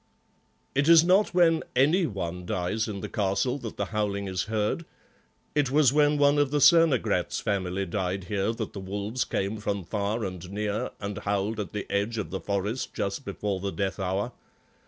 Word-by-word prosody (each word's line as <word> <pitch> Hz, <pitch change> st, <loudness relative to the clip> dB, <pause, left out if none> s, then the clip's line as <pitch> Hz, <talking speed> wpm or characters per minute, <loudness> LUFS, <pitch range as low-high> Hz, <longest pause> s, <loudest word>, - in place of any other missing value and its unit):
"It 140 Hz, +3 st, +2 dB
is 165 Hz, -1 st, +9 dB
not 185 Hz, +4 st, +4 dB
when 170 Hz, -2 st, +4 dB
any 155 Hz, +8 st, +4 dB
one 90 Hz, -4 st, -4 dB
dies 90 Hz, +7 st, -1 dB
in 100 Hz, -3 st, -5 dB
the -, -, -4 dB
castle 105 Hz, +7 st, 0 dB
that 115 Hz, -4 st, -7 dB
the 100 Hz, -, -1 dB
howling 100 Hz, -2 st, -1 dB
is 90 Hz, -2 st, -2 dB
heard. 110 Hz, +8 st, -1 dB, 0.7 s
It 145 Hz, -3 st, +2 dB
was 140 Hz, -1 st, +4 dB
when 150 Hz, 0 st, +4 dB
one 145 Hz, 0 st, +4 dB
of 145 Hz, -2 st, +3 dB
the 150 Hz, -, 0 dB
Cernogratz 165 Hz, -, +4 dB
family 95 Hz, -1 st, -1 dB
died 95 Hz, +1 st, -2 dB
here 100 Hz, +3 st, -1 dB
that 115 Hz, -2 st, -5 dB
the 100 Hz, -, -6 dB
wolves 100 Hz, +5 st, -2 dB
came 100 Hz, +3 st, -2 dB
from 100 Hz, -2 st, -2 dB
far 105 Hz, +5 st, -2 dB
and 90 Hz, -1 st, -6 dB
near 105 Hz, +1 st, -2 dB
and 100 Hz, 0 st, -4 dB
howled 100 Hz, +2 st, -1 dB
at 105 Hz, -, -4 dB
the 105 Hz, -, -4 dB
edge 105 Hz, +3 st, 0 dB
of 105 Hz, -, -4 dB
the 95 Hz, -, -3 dB
forest 105 Hz, +5 st, -2 dB
just 100 Hz, +8 st, -2 dB
before 100 Hz, -2 st, -3 dB
the 100 Hz, +1 st, -3 dB
death 100 Hz, 0 st, -2 dB
hour. 95 Hz, +5 st, -1 dB
105 Hz, 185 wpm, -27 LUFS, 100-130 Hz, 0.7 s, is